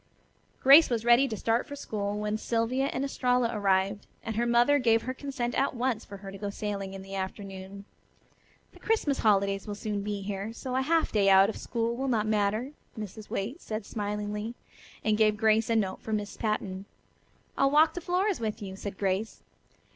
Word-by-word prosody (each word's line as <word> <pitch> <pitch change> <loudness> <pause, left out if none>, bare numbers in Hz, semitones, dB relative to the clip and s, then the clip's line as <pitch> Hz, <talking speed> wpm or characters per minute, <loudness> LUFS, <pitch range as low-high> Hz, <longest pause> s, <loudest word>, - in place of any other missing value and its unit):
Grace 280 +5 +8
was 235 -2 -1
ready 240 +3 +6
to 220 -4 -4
start 230 +3 0
for 285 - -7
school 205 -6 -3
when 210 0 -1
Sylvia 230 +4 0
and 275 0 -2
Estralla 250 -3 +1
arrived, 195 0 +1 0.2
and 225 -1 -4
her 235 +2 +1
mother 240 +5 +4
gave 225 -3 +3
her 255 - -3
consent 260 -3 -4
at 275 - 0
once 240 -2 -1
for 200 - -10
her 195 - -6
to 195 - -10
go 205 - -3
sailing 200 -1 -4
in 190 - -8
the 195 0 -10
afternoon. 195 0 -6 0.9
"The - - -18
Christmas 375 -11 0
holidays 200 -1 +2
will 205 - -4
soon 205 -1 -3
be 205 -1 -4
here, 200 +2 -4
so 255 +2 -5
a 260 - +2
half 325 +4 +1
day 200 -2 +3
out 195 +1 +7
of 225 - -5
school 235 -1 -2
will 265 +2 -2
not 225 -4 +1
matter," 215 +4 0 0.3
Mrs. 215 0 -7
Waite 235 - -3
said 215 -1 -5
smilingly, 210 +1 -4 0.5
and 215 0 +1
gave 215 -1 +4
Grace 220 +1 +3
a 230 - +2
note 195 -4 0
for 220 - -4
Miss 210 -1 -2
Patten. 200 -3 -2 0.7
"I'll 275 - +3
walk 310 +2 +5
to 355 - -5
Flora's 370 +3 0
with 220 -1 -3
you," 195 -3 -7
said 195 0 -6
Grace. 195 +2 -2
215 Hz, 195 wpm, -28 LUFS, 200-245 Hz, 0.9 s, Grace